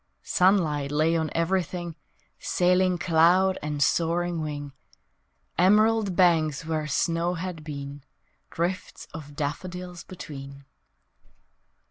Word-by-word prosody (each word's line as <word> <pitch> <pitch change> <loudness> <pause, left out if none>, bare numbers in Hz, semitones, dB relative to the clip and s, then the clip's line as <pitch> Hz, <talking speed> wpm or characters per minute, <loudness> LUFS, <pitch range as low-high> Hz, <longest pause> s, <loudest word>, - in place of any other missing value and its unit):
Sunlight 160 -7 +2
lay 155 +3 +2
on 160 -1 0
everything, 175 -1 -1 0.4
Sailing 180 0 +2
cloud 175 +3 +3
and 150 -1 0
soaring 170 0 +1
wing, 145 -2 -5 0.9
Emerald 210 +1 +4
banks 165 -4 +3
where 155 -1 -2
snow 170 +3 0
had 170 -2 -5
been, 140 -2 -7 0.5
Drifts 180 +4 -3
of 145 -2 -9
daffodils 175 +4 -5
between. 140 -6 -9
165 Hz, 95 wpm, -26 LUFS, 150-180 Hz, 0.9 s, Emerald